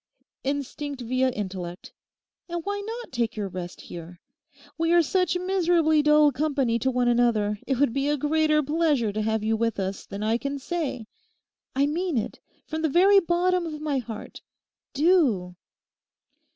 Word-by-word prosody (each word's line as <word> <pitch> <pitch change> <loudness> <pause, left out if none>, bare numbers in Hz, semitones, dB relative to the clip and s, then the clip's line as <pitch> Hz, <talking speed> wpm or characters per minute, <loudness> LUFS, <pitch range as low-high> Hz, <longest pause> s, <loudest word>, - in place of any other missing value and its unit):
Instinct 280 0 -3
via 255 +2 +1
intellect. 185 -6 -6 0.6
And 345 -1 -4
why 405 0 -2
not 455 +4 -6
take 235 -3 -1
your 210 -2 -2
rest 180 -1 -7
here? 170 0 -10 0.6
We 330 +2 +1
are 345 -1 +6
such 365 +1 +1
miserably 350 -4 +2
dull 300 0 +5
company 270 -4 0
to 260 - +1
one 250 -1 +1
another 230 -4 +2
it 265 -2 0
would 280 -5 +3
be 275 +1 0
a 295 - +1
greater 305 +1 +2
pleasure 295 -7 +1
to 215 - -1
have 220 0 0
you 220 +1 +1
with 230 -1 -1
us 195 0 -4
than 200 +1 -5
I 225 +2 +1
can 280 +1 -3
say. 280 -5 -3 0.7
I 275 +1 +3
mean 330 +1 -1
it 220 - -3 0.3
from 315 0 -4
the 320 - +1
very 390 +6 +6
bottom 350 0 +1
of 305 -2 -6
my 295 -3 -1
heart. 225 -3 -8 0.5
Do! 275 - +2
280 Hz, 165 wpm, -25 LUFS, 225-325 Hz, 0.7 s, are